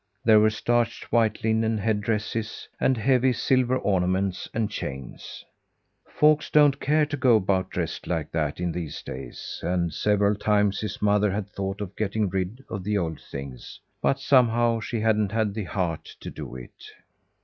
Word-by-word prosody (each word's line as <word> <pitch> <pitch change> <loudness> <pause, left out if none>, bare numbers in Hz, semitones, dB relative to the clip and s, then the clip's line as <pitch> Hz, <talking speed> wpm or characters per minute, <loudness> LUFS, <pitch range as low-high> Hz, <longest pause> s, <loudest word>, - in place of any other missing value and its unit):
There 110 -1 +7
were 110 +1 +5
starched 115 +2 -1
white 110 -3 +2
linen 110 0 +1
head 105 0 0
dresses, 110 +1 -3
and 130 - +2
heavy 130 +2 +3
silver 130 0 +2
ornaments 95 -2 0
and 110 -1 0
chains. 65 - -7 0.6
Folks 150 0 +3
don't 145 -2 +5
care 150 +2 +2
to 145 0 -4
go 130 -4 +4
about 95 -2 +1
dressed - - -4
like 80 -4 -2
that 75 -2 -1
in 90 -1 -1
these 80 -4 -5
days, 65 -1 -7
and 85 -2 -1
several 105 0 +2
times 105 -1 +1
his 105 -1 -5
mother 105 0 +3
had 100 +1 -3
thought 95 +1 -4
of 100 -1 -6
getting 105 -1 -1
rid 95 +7 -3
of 95 - -5
the 105 +2 0
old 80 -4 -3
things; 70 -2 -9 0.2
but 70 0 +1
somehow, 120 -3 +3
she 115 0 -3
hadn't 110 -2 +1
had 110 -3 0
the 105 -2 -4
heart 90 -4 -2 0.2
to - - -6
do 65 -5 -8
it. 60 -1 -11
105 Hz, 170 wpm, -25 LUFS, 95-115 Hz, 0.6 s, There